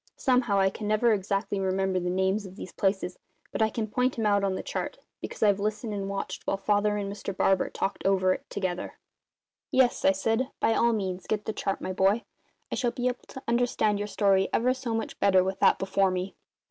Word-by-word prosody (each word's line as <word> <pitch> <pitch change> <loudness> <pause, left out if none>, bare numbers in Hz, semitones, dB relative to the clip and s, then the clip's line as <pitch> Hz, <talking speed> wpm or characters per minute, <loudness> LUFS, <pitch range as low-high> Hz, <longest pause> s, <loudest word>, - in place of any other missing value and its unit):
Somehow, 250 -6 +2
I 190 0 +3
never 215 +3 +2
can - - +5
exactly 200 +1 -2
remember 190 0 0
the 180 0 -2
names 190 +3 0
of 185 - -12
these 185 - -8
places, 190 -2 -1 0.3
but - - -3
I 220 - +4
can 220 0 -2
point 250 +4 0
'em 225 - 0
out 205 -1 +3
on 195 -1 +1
the - - -4
chart, - - -4 0.2
because - - -4
I've 205 -2 +4
listened 215 +2 -2
and 195 -1 -3
watched 200 0 -4
while 195 - +1
Father 205 +1 +1
and 200 -1 -2
Mr 195 -1 -6
Barber 195 -1 +2
talked 195 - -3
it - - +1
over 185 -1 +3
together." 185 -3 -3 0.7
"Yes," 255 -2 +3
I - - +6
said, 225 +7 0
"by 225 - +3
all 235 +1 +3
means 190 -3 -3
get 210 -1 -1
the 220 - -2
chart, 195 - -2
my 185 - -3
boy. 195 +5 +2 0.5
I - - 0
shall 245 - +1
be 245 +1 -1
able 250 - -6
to 265 - -10
understand 235 -3 +1
your 205 - -2
story 195 -2 +2
ever 250 +2 +2
so 255 -3 -3
much 225 - -4
better 190 -2 +4
with 190 +1 -3
that - - +5
before 195 0 +1
me." 185 +1 -3
200 Hz, 220 wpm, -27 LUFS, 190-225 Hz, 0.7 s, I